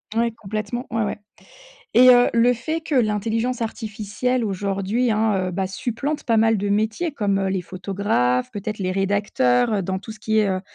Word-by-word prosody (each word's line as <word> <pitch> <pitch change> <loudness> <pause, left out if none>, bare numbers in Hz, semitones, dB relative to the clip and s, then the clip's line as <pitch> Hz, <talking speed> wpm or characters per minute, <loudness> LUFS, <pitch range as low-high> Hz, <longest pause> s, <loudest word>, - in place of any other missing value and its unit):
Ouais 235 +1 +2
complètement 215 +2 -5
ouais, 225 -1 0
ouais 210 - -3 0.8
et, 255 +1 +7
heu, 245 -1 +7
le 235 +1 +4
fait 315 +7 -3
que 320 -2 -4
l'intelligence 225 +1 0
artificielle 225 +2 -2
aujourd'hui, 200 +4 -1
hein, 210 -4 +1
heu, - - -3
bah, 190 +2 -2
supplante 245 +9 -3
pas 230 -3 +2
mal 225 0 +4
de 205 0 -2
métiers 220 +11 0
comme, 205 -7 0
heu, 195 0 0
les 190 -1 -1
photographes 180 - -1
peut-être 210 +1 -5
les 185 -2 -1
rédacteurs, 195 - +1
heu, 200 - 0
dans 190 +1 -2
tout 220 +3 -9
ce 215 - -14
qui 220 0 +1
est, 210 -2 +3
heu, 185 -1 -1
215 Hz, 190 wpm, -22 LUFS, 195-230 Hz, 0.8 s, et